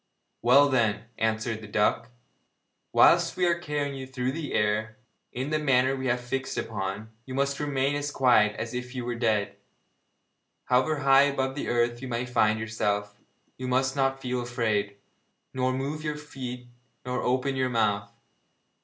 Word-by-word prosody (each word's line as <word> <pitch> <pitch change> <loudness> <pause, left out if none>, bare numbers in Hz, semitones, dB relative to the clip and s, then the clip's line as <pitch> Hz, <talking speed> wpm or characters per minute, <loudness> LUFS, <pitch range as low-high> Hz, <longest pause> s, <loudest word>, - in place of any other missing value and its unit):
'Well, 135 +5 +6
then,' 115 -7 +1 0.2
answered 110 0 -1
the 110 - -9
duck, 105 +3 +1 0.8
'whilst - - +5
we 180 - +2
are 170 -1 +2
carrying 145 -3 -2
you 135 -1 -7
through 130 -1 -2
the 155 +1 -5
air, 105 +2 0 0.3
in 130 +4 -4
the 155 - +1
manner 130 -3 +3
that 135 - -2
we 130 0 -3
have 120 0 +1
fixed 135 +2 -3
upon, 100 +1 -4 0.2
you 130 - -5
must 140 +1 0
remain 140 -1 0
as 145 0 -2
quiet 120 -7 +3
as 115 +1 -5
if 125 +1 -5
you 125 -2 -3
were 120 - -2
dead. 110 -4 0 1.1
However 135 +4 +2
high 135 0 +6
above 135 -1 -1
the 145 - -4
earth 120 0 0
you 130 - -5
may 120 0 -2
find 110 -3 +2
yourself, 105 -2 -2 0.4
you 130 - -4
must 130 +1 +1
not 135 -1 +1
feel 125 -1 -2
afraid, 110 -4 -1 0.6
nor 130 0 0
move 140 +4 -3
your 150 -1 -2
feet 125 -4 -7 0.4
nor 125 0 -2
open 130 +2 0
your 130 -1 0
mouth. 105 -4 0
125 Hz, 170 wpm, -27 LUFS, 110-135 Hz, 1.1 s, Well